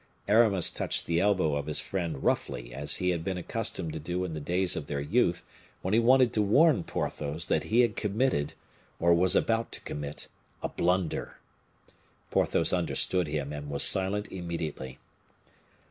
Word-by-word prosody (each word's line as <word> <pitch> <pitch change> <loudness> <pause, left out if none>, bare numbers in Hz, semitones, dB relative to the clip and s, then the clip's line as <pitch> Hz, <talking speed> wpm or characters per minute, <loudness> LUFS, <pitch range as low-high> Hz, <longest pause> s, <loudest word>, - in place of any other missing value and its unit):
Aramis 105 -5 +4
touched - - -2
the 85 0 +1
elbow 95 -6 +2
of 70 -1 -3
his - - 0
friend 85 -7 -4
roughly, - - -1
as 75 +2 -1
he 90 -1 0
had 85 -2 -2
been 95 0 -3
accustomed 85 -2 -4
to 80 - -5
do 90 +4 -3
in 85 - -5
the 80 - -4
days 90 +4 +1
of 75 - -5
their 70 - -3
youth, 85 +3 +1 0.4
when 95 - -1
he 115 - +5
wanted 125 +1 +4
to 105 - +2
warn 130 - +4
Porthos 75 +2 -3
that - - 0
he 115 +3 +3
had 120 - +1
committed, 105 - 0 0.4
or 85 +1 +4
was 90 +2 +5
about 115 0 +1
to - - -6
commit, 75 0 -5 0.4
a - - -1
blunder. 90 -1 -1 0.9
Porthos - - +1
understood 90 -3 +1
him, 75 -1 -3
and 75 0 -6
was 70 -1 +1
silent 100 +2 +2
immediately. 80 -7 -5
90 Hz, 170 wpm, -28 LUFS, 75-100 Hz, 0.9 s, he